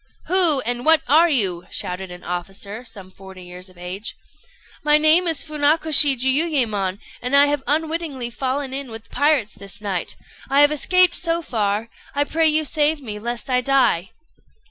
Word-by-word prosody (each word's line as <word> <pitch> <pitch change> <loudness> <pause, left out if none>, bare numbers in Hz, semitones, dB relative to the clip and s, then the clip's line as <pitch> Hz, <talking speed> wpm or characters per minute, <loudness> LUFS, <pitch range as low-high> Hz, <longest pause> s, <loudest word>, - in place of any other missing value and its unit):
"Who 340 -7 +5
and 245 0 -3
what 320 0 +5
are 320 +6 +4
you?" 190 - -1
shouted 180 +1 -5
an 180 0 -11
officer, 195 +5 -6
some 195 -6 -11
forty 190 -1 -13
years 180 +1 -11
of 180 - -21
age. 180 +4 -7 0.7
"My 300 0 +4
name 315 +4 +4
is 320 -4 +1
Funakoshi 300 -1 +3
Jiuyémon, 255 - 0 0.2
and 250 +3 -1
I 285 +1 +7
have 290 -1 -1
unwittingly 310 -5 -2
fallen 265 +2 -3
in 275 -1 -5
with 225 0 -11
pirates 285 -8 +1
this 200 0 -4
night. 195 -4 -4 0.3
I 275 +1 +4
have 290 0 +5
escaped 365 +4 +3
so 335 0 -1
far: 215 -3 -2 0.3
I 285 - +2
pray 320 +2 +1
you 310 0 +2
save 300 +1 +1
me, 215 -6 -7
lest 235 +2 -5
I 250 -1 +1
die." 250 -9 +1
265 Hz, 165 wpm, -20 LUFS, 205-305 Hz, 0.7 s, I